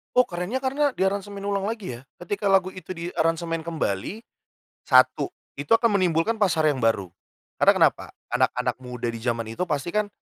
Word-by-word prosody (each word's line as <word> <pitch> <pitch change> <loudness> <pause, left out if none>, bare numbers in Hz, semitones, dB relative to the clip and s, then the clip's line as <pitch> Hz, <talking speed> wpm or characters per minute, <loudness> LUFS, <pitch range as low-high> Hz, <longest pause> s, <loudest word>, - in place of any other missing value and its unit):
Oh 250 -1 +5
kerennya 180 +8 -3
karena 275 +2 +1
diaransemen 200 -1 -2
ulang 200 -1 0
lagi 200 - -6
ya, 120 - -12 0.2
ketika 200 +3 -1
lagu 190 -1 +4
itu 185 -2 -8
diaransemen 165 -1 -1
kembali, 160 - -3 0.6
1, - - +4 0.3
itu 145 - -7
akan 225 -4 +2
menimbulkan 180 +5 +1
pasar 165 -6 +2
yang 130 - -5
baru, 100 -6 +1 0.5
karena - - +7
kenapa? - - +2 0.2
Anak-anak - - +1
muda 125 -2 -4
di 115 - -7
zaman 115 -1 -1
itu 180 +9 -3
pasti 170 +3 -2
kan 210 -1 +1
180 Hz, 165 wpm, -25 LUFS, 145-205 Hz, 0.6 s, karena